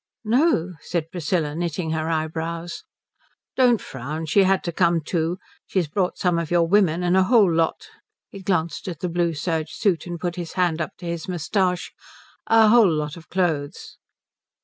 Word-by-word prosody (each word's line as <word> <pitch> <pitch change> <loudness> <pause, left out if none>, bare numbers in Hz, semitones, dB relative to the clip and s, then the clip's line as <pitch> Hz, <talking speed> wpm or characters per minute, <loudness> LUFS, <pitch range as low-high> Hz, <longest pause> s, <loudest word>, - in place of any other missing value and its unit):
"No," 225 - +2
said 165 -2 -3
Priscilla, 165 -3 -1
knitting 165 0 -3
her 160 0 -1
eyebrows. 165 +1 -3 0.7
"Don't 245 -4 +4
frown. 145 +5 -6
She 180 +6 +3
had 190 0 +2
to 170 - -2
come 170 -1 +2
too. 165 +2 -1 0.3
She's 185 -5 0
brought 180 +4 -1
some 175 -2 +1
of 165 -2 -4
your 170 -1 +3
women 180 -3 +3
and 175 +1 +2
a 190 0 +4
whole 210 -6 +4
lot" 165 0 0 0.5
he 195 - -9
glanced 170 -4 -1
at 170 -5 -6
the 180 - -1
blue 170 -1 0
serge 160 0 -2
suit 185 -5 0
and 175 -1 -5
put 175 +1 -3
his 170 -2 -5
hand 175 -3 +1
up 190 - -5
to 180 - -10
his 170 -1 -4
moustache 180 +1 -1 0.5
"a 225 -1 +6
whole 220 -5 +6
lot 150 -1 -2
of 165 -1 -14
clothes." 160 -6 -2
170 Hz, 175 wpm, -23 LUFS, 160-185 Hz, 0.7 s, a